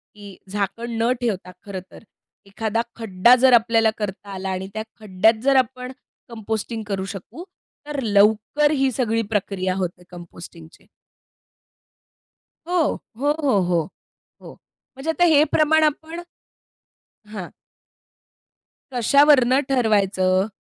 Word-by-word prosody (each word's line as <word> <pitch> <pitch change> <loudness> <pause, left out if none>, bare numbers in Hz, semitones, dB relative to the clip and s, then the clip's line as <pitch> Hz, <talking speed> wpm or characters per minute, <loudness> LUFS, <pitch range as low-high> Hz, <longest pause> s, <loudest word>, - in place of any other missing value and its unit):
की 205 -2 -12
झाकण 205 +4 -3
न 235 +2 +2
ठेवता 195 -6 -3
खरं 200 -2 -6
तर, - - -14 0.4
एखादा 220 +3 -2
खड्डा 225 +1 +4
जर 260 -1 +6
आपल्याला 225 -1 +4
करता 200 -1 -6
आला 190 0 -5
आणि 190 0 -4
त्या 220 0 -4 0.2
खड्ड्यात 215 +2 +2
जर 275 0 +3
आपण 255 0 0 0.4
कंपोस्टिंग 220 0 -4
करू 195 -2 -3
शकू 195 - -10 0.4
तर 295 -1 -4
लवकर 220 +7 +3
ही 270 -3 +1
सगळी 230 -2 0
प्रक्रिया 190 -3 -1
होते 180 -2 -4
कंपोस्टिंगची. 170 -2 -13 1.8
हो, 360 - -2 0.4
हो, 285 +3 +1
हो, 265 -8 +2
हो, 175 -2 +1 0.6
हो, - - -11 0.4
म्हणजे 275 +5 -3
आता 350 +2 +2
हे 310 -4 +5
प्रमाण 315 +1 +3
आपण 315 +3 -2 1.1
हां. 190 -5 -6 1.4
कशावरुन 260 +1 +4
ठरवायचं? 200 -6 +2
220 Hz, 115 wpm, -22 LUFS, 195-260 Hz, 1.8 s, जर